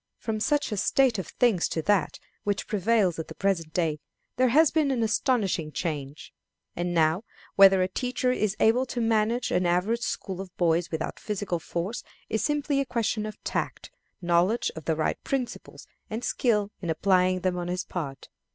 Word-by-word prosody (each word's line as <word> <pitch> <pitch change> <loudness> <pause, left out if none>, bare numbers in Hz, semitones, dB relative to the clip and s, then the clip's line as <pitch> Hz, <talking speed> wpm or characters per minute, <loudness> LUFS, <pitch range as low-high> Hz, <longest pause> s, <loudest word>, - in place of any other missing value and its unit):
From 220 -1 -3
such 290 +3 +1
a 210 - -2
state 250 +1 +2
of 185 - -5
things 225 -8 +2
to 160 - -2
that 205 -2 +1 0.3
which 205 -1 -1
prevails 210 -4 +1
at 160 - -4
the - - -9
present 180 -5 0
day 160 -3 0 0.4
there 255 +1 +3
has 300 +5 +5
been 305 -3 +2
an 250 -4 +1
astonishing 210 - 0
change. 150 -3 -5 0.4
And 175 +1 -2
now, 165 +3 +2 0.3
whether 195 -1 +7
a - - +1
teacher 250 +5 -1
is 215 -4 0
able 245 +4 +3
to 245 - -4
manage 225 +1 +1
an 180 0 +2
average 190 +7 +1
school 190 -5 -3
of 195 - -8
boys 170 0 +2
without 160 -1 -4
physical 205 -4 -3
force 175 +8 -4 0.3
is 220 - -1
simply 295 -1 0
a 275 - +1
question 220 -3 -1
of 215 - -8
tact, - - -3 0.3
knowledge 175 +6 +2
of 160 - -8
the 160 - +1
right 155 0 -1
principles, 260 -3 -4 0.2
and 220 +3 -4
skill 210 -5 +1
in 175 - -4
applying 185 +2 +2
them 185 -1 0
on 175 -1 -3
his 180 +2 -2
part. 140 -7 -6
195 Hz, 180 wpm, -27 LUFS, 175-235 Hz, 0.4 s, whether